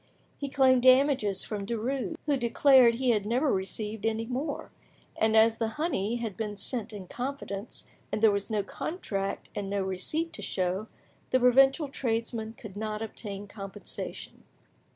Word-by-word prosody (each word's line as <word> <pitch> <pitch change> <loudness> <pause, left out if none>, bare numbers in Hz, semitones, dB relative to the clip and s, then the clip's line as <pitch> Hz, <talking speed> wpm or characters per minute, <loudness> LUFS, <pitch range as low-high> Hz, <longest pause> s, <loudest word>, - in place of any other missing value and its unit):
He 280 - -5
claimed 260 -2 +4
damages 255 -6 +4
from 210 -2 -4
Derues, 240 +8 -2
who 295 -2 +2
declared 250 -1 +5
he 250 0 +2
had 210 -3 +1
never 250 +7 +1
received 210 +3 -3
any 225 0 0
more, 275 +5 -4 0.4
and 220 0 +3
as 225 +1 +5
the 225 - +1
honey 240 - 0
had 230 -5 -4
been 210 -2 -4
sent 225 +2 -2
in 205 -3 -7
confidence, 245 -3 -5 0.3
and - - -1
there 220 -1 +6
was 200 0 -2
no 210 -2 0
contract 200 - -4
and 200 -1 -4
no 200 -1 0
receipt 190 - -2
to - - -6
show, 185 +3 -1 0.4
the 255 - +3
provincial 270 +4 +5
tradesman 225 -4 -2
could 215 -4 -11
not 215 +1 -3
obtain 205 -2 -6
compensation. 200 0 -7
225 Hz, 155 wpm, -29 LUFS, 205-260 Hz, 0.4 s, there